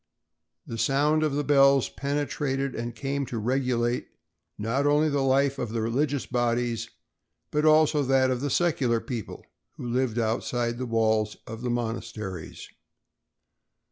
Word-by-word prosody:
The 115 - -6
sound 150 +5 +2
of 155 -2 +1
the 145 - 0
bells 140 -2 +5
penetrated 140 -1 -2
and 120 +1 -5
came 140 +3 -2
to 120 - -4
regulate 125 0 0 0.5
not 115 +7 0
only 150 +2 +3
the 140 -1 0
life 135 +1 +2
of 120 - -2
the 115 - -1
religious 135 +4 0
bodies 120 -2 -1 0.6
but 150 +1 +1
also 155 -1 +5
that 130 -1 +3
of 125 -1 -1
the 145 - -1
secular 135 -7 +1
people 115 -4 -6 0.3
who 125 - -6
lived 120 -1 0
outside 120 +1 -1
the 130 - -3
walls 110 -2 +1
of 115 +1 -8
the 125 - -2
monasteries. 110 -6 -4
125 Hz, 140 wpm, -26 LUFS, 115-140 Hz, 0.6 s, bells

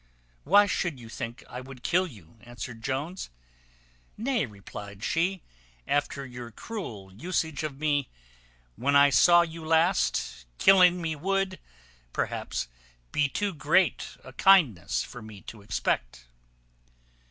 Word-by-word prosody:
"Why 205 +6 +7
should 175 -7 -1
you 115 -2 -11
think 115 +1 -6
I 125 - -7
would 130 -1 -12
kill 185 +2 +2
you?" 110 - -15
answered 120 -1 -8
Jones. 140 +9 -3 0.9
"Nay," 235 - 0
replied 100 0 -10
she, 180 +6 0 0.4
"after 140 -1 -1
your 125 -2 -8
cruel 110 - -7
usage 160 - -2
of 150 -3 -4
me 145 -3 0 0.7
when 140 +4 +1
I 140 0 +7
saw 175 +4 +7
you 165 -1 -7
last, 160 - +1
killing 180 - +6
me 160 -1 -1
would, 195 +4 -1 0.5
perhaps, - - -2 0.4
be 150 -1 +2
too 205 +6 -1
great 165 +4 +1 0.2
kindness 150 - +4
for 120 - -10
me 110 -2 -11
to 110 - -11
expect." - - -2
145 Hz, 125 wpm, -28 LUFS, 115-175 Hz, 0.9 s, Why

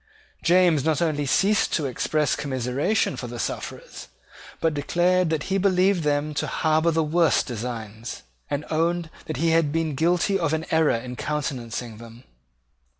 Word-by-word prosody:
James 175 -5 +4
not 155 -1 +1
only 150 -4 0
ceased 195 +10 +2
to 155 - 0
express 150 +3 0
commiseration 130 - -1
for - - -6
the - - -7
sufferers, - - -6 0.5
but 165 -1 +1
declared 175 +4 +1
that 155 -2 -1
he 195 0 0
believed 190 -1 +3
them 150 0 0
to - - -2
harbour 160 +1 +2
the 160 -1 +1
worst 165 +1 +2
designs, 115 -2 -6 0.3
and 145 +1 -2
owned 165 +1 0 0.2
that 155 - -4
he 165 +3 +2
had 160 -3 +3
been 160 -1 -1
guilty 175 +6 +1
of 165 -3 0
an 160 +1 -1
error 160 -1 +4
in 125 +2 -5
countenancing 125 -6 -4
them. 115 +1 -12
155 Hz, 155 wpm, -24 LUFS, 135-170 Hz, 0.5 s, James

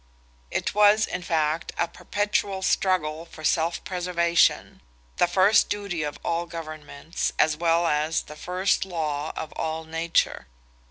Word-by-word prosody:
It - - -2
was, 210 +1 +5
in - - -4
fact, 160 -2 -1
a 170 - +1
perpetual 200 +1 -2
struggle 165 -5 +1
for 165 -2 -13
self 165 +2 +1
preservation—the 170 - 0
first 195 +4 +4
duty 200 -5 -3
of 150 -1 -3
all 170 +1 -1
governments, 155 -1 -5
as 155 - +3
well 170 +1 +2
as 155 0 +1
the 150 - -11
first 180 +4 0
law 155 -5 -3
of 160 - -5
all 160 0 -3
nature. 165 +1 0
170 Hz, 130 wpm, -25 LUFS, 155-180 Hz, -, was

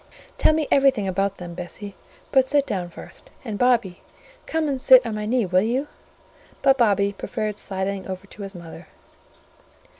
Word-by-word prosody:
Tell - - +5
me 310 -1 0
everything 270 -7 +3
about 195 +1 -1
them, 175 -1 -8
Bessie: 185 +4 -7 0.4
but 265 -1 +3
sit 285 -1 +3
down 185 -8 -3
first; - - -13 0.2
and, 215 -4 -4
Bobby, 235 -8 +2 0.5
come 320 -1 0
and 270 -3 -2
sit 255 -1 +7
on 230 - -3
my 210 0 -3
knee, 240 -1 +1
will 185 0 +3
you?" 250 +7 -1 0.8
but 270 - +6
Bobby 200 -3 +3
preferred 210 +1 -4
sidling 190 0 -3
over 190 0 -6
to 205 - -12
his 195 -1 -7
mother. 170 -2 -11
210 Hz, 170 wpm, -23 LUFS, 190-255 Hz, 0.8 s, sit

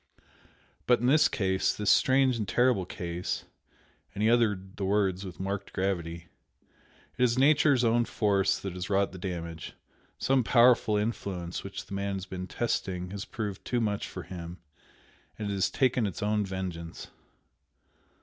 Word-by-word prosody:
But 125 - +5
in 120 - -2
this 145 +3 +5
case, 95 -3 0
this 105 -1 +2
strange 130 -1 +4
and 105 -3 -3
terrible 120 -7 +2
case" 85 0 -4 0.7
and 105 - -2
he 110 - +4
uttered 105 -5 +1
the 100 - -3
words 95 -1 +1
with 90 -3 -8
marked 100 +1 -4
gravity, 85 -3 -2 0.9
"It - - +4
is 120 0 +3
Nature's 145 -1 +4
own 120 0 +3
force 100 -4 +1
that 95 -2 -5
has 90 +2 -5
wrought 100 0 +2
the 95 - -9
damage, 85 -3 -5 0.4
some 135 -1 +2
powerful 120 -2 +4
influence 100 -5 -3
which 100 - -7
the - - -10
man 100 0 -2
has 95 -1 -5
been 95 -1 -6
testing 95 -6 -2
has 100 0 -5
proved 105 -4 -5
too 120 - -1
much 105 -3 -1
for - - -7
him 85 -1 -8 0.8
and 105 -2 -3
it - - -1
has 95 -2 +1
taken 125 -4 +1
its 100 - -5
own 105 -1 +1
vengeance." 90 -3 -6
100 Hz, 160 wpm, -29 LUFS, 95-115 Hz, 0.9 s, But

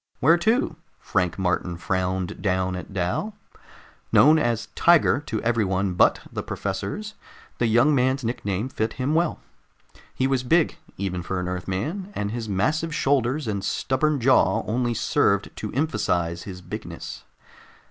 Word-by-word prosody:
"Where 165 +6 +5
to?" 220 - +1 0.2
Frank 90 -2 -1
Martin 90 -2 -1
frowned 95 +1 -2
down 95 -1 0
at 90 - -7
Dal. 100 - -2 0.8
Known 155 +3 +6
as 120 -6 -1
"Tiger" 170 -4 +4
to 110 - -2
everyone 100 -5 +1
but 90 - +3
the - - -2
professors, 100 - -4 0.5
the 120 - +2
young 120 +7 +4
man's 130 0 +1
nickname 110 -2 -2
fit 110 -4 -2
him 135 +3 -1
well. 170 +1 +1 0.8
He 130 - +1
was 135 -1 +1
big, 160 +6 +2 0.2
even 90 -2 -2
for 90 +2 -3
an 90 - -3
Earthman, 95 - -3
and 100 0 -2
his 115 -1 -4
massive 155 - 0
shoulders 135 0 +1
and 100 -3 -2
stubborn 145 +3 0
jaw 115 -5 +3
only 120 +1 0
served - - +1
to - - -5
emphasize 85 - -1
his 90 -2 -8
bigness. - - -7
115 Hz, 145 wpm, -24 LUFS, 95-145 Hz, 0.8 s, Known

